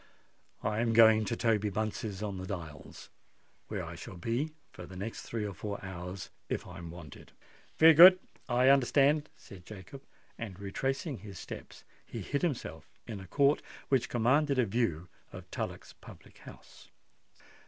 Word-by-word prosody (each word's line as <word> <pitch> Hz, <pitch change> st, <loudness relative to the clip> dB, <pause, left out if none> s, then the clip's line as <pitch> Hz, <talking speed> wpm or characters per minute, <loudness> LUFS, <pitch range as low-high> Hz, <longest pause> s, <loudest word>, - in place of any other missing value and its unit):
"I 105 Hz, +1 st, 0 dB
am 115 Hz, -1 st, +1 dB
going 110 Hz, -1 st, +7 dB
to -, -, -1 dB
Toby 105 Hz, -3 st, +1 dB
Bunce's 105 Hz, 0 st, -3 dB
in 100 Hz, -2 st, -3 dB
the 95 Hz, 0 st, -6 dB
Dials, 80 Hz, -7 st, -8 dB, 0.6 s
where -, -, -4 dB
I -, -, -7 dB
shall 95 Hz, -, -9 dB
be 120 Hz, -, -1 dB, 0.2 s
for 90 Hz, -, -10 dB
the 95 Hz, -, -11 dB
next 105 Hz, +5 st, -5 dB
three 115 Hz, -2 st, -4 dB
or 100 Hz, -, -4 dB
four 100 Hz, +1 st, -5 dB
hours 90 Hz, 0 st, -7 dB, 0.2 s
if -, -, -2 dB
I'm 85 Hz, -1 st, -9 dB
wanted." 85 Hz, -4 st, -11 dB, 0.4 s
"Very 160 Hz, 0 st, +9 dB
good—I 160 Hz, -7 st, +6 dB
understand," 140 Hz, +3 st, +4 dB
said 95 Hz, -3 st, -13 dB
Jacob; 105 Hz, +7 st, -10 dB, 0.4 s
and 100 Hz, -5 st, -6 dB
retracing 135 Hz, -, -3 dB
his 100 Hz, -1 st, -10 dB
steps, -, -, -9 dB, 0.2 s
he -, -, -7 dB
hid 140 Hz, -, -2 dB
himself 115 Hz, -, -3 dB, 0.2 s
in 110 Hz, -4 st, -6 dB
a 95 Hz, -, -10 dB
court 140 Hz, +8 st, +3 dB, 0.3 s
which 125 Hz, -4 st, +2 dB
commanded 135 Hz, +5 st, +2 dB
a 125 Hz, -, +4 dB
view 95 Hz, -6 st, -1 dB, 0.2 s
of -, -, -11 dB
Tullock's -, -, -5 dB
public -, -, -15 dB
house. -, -, -14 dB
110 Hz, 155 wpm, -31 LUFS, 95-135 Hz, 0.6 s, Very